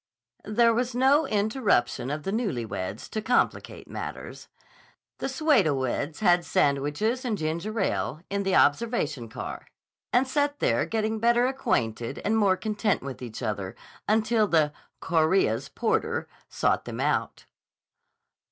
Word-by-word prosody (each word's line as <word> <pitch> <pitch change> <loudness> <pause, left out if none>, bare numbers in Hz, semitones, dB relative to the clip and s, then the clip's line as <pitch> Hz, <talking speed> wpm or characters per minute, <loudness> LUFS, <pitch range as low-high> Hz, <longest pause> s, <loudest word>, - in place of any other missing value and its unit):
There 230 +2 +4
was 245 +1 -1
no 275 +5 +4
irruption 210 - +1
of 150 +1 -3
the 195 - -2
newly 200 - -1
weds 100 0 -5
to 215 - -3
complicate 245 +3 0
matters. - - -7 0.7
The - - -2
pseudo 265 - +3
weds 135 - -2
had 175 -3 +4
sandwiches 145 - 0
and 230 -5 -1
ginger 170 +8 -3
ale 165 -4 -1
in 200 0 -2
the 195 -1 +1
observation 145 - +1
car - - -7 0.4
and 255 +2 +3
sat 290 +1 0
there - - +1
getting 220 0 -1
better 235 +2 +3
acquainted 125 - -1
and 215 - +2
more 200 -4 +3
content 210 - -1
with 135 -2 -7
each 120 0 -7
other 100 -4 -3 0.3
until 220 0 +2
the 155 -4 +2 0.3
"Chorea's" 160 - +2
porter 450 - -1 0.2
sought - - 0
them - - -6
out. - - -1
205 Hz, 135 wpm, -26 LUFS, 145-235 Hz, 0.7 s, There